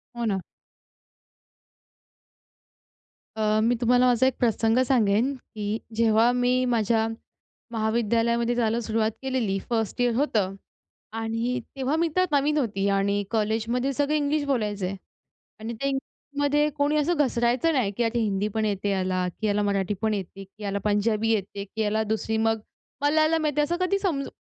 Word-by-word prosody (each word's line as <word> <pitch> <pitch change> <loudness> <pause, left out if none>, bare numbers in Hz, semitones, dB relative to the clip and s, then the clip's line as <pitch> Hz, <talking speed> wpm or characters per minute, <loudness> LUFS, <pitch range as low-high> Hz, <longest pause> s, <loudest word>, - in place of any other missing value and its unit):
हो 235 0 -2
ना. 195 -3 0 3.0
अ, 215 0 +1
मी 240 +2 +3
तुम्हाला 245 +1 +4
माझा 250 +1 +4
एक 265 - 0
प्रसंग 225 -1 +2
सांगेन. 235 +1 +2
की 215 -3 -5 0.2
जेव्हा 225 +1 +4
मी 250 +1 +2
माझ्या 225 -2 +1 0.6
महाविद्यालयामध्ये 235 +1 +1
जायला 230 -1 +1
सुरुवात 220 0 0
केलेली 255 -7 -1
फर्स्ट 225 0 -1
इयर 245 -1 +2
होतं 215 -8 0 0.6
आणि 230 +3 -1 0.2
तेव्हा 270 +2 -1
मी 335 +1 +2
तर 370 0 +4
नवीन 295 +1 +2
होती. 205 -8 0
आणि 200 +1 +1
कॉलेजमध्ये 230 +4 0
सगळं 290 +2 0
इंग्लिश 295 0 +1
बोलायचे. 205 -7 -1 0.6
आणि 225 +2 -5
ते 255 +5 -3
इंग्लिशमध्ये 285 +2 -1
कोणी 290 +1 +2
असं 315 +3 +1
घसरायचं 250 +2 +2
नाही, 245 -8 +1
की 240 - +2
आता 235 +1 0
हिंदी 205 -2 0
पण 220 -1 +1
येते 205 -1 -1
याला 185 -2 0
की 215 - -1
याला 205 0 +1
मराठी 200 -1 0
पण 220 -1 +1
येते 195 0 -5
की 200 +2 -15
याला 200 0 -2
पंजाबी 215 +1 +1
येते 200 -1 -2
की 220 +3 -5
याला 215 +1 +1
दुसरी 220 +1 -1
मग 225 0 +1 0.4
मलयालम 310 +2 +3
येते, 295 0 +1
असं 305 +4 0
कधी 395 +2 +1
समजू 310 -9 -1
230 Hz, 150 wpm, -25 LUFS, 210-265 Hz, 3.0 s, तुम्हाला